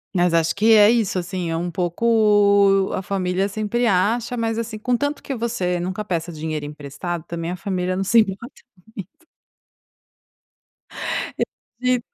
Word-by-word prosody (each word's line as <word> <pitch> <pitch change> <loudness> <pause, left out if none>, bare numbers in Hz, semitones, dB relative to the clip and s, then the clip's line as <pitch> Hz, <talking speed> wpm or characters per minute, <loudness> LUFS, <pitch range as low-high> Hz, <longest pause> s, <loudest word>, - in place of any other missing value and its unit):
Mas 175 -1 +3
acho 165 0 +2
que 220 +3 +4
é 210 0 +7
isso, 220 -6 +1
assim, 180 -1 -3
é 165 - -1
um 175 +1 -3
pouco 200 +1 +3
a - - -2
família 190 0 -1
sempre 215 +4 -1
acha, 225 +5 +1
mas, 225 0 -1
assim, 225 -1 -4
com 245 +3 0
tanto 285 +4 -2
que 275 - -4
você 220 -7 -1
nunca 185 +4 -4
peça 170 -2 -2
dinheiro 155 -1 -4
emprestado 150 +3 -6
também, 170 0 -5
a 180 - -3
família 185 -1 -2
não 195 - -1
se 230 +4 +4
importa 215 +4 -2 0.5
muito. 335 - -33 2.1
É 250 +1 -2
195 Hz, 155 wpm, -21 LUFS, 175-225 Hz, 2.1 s, é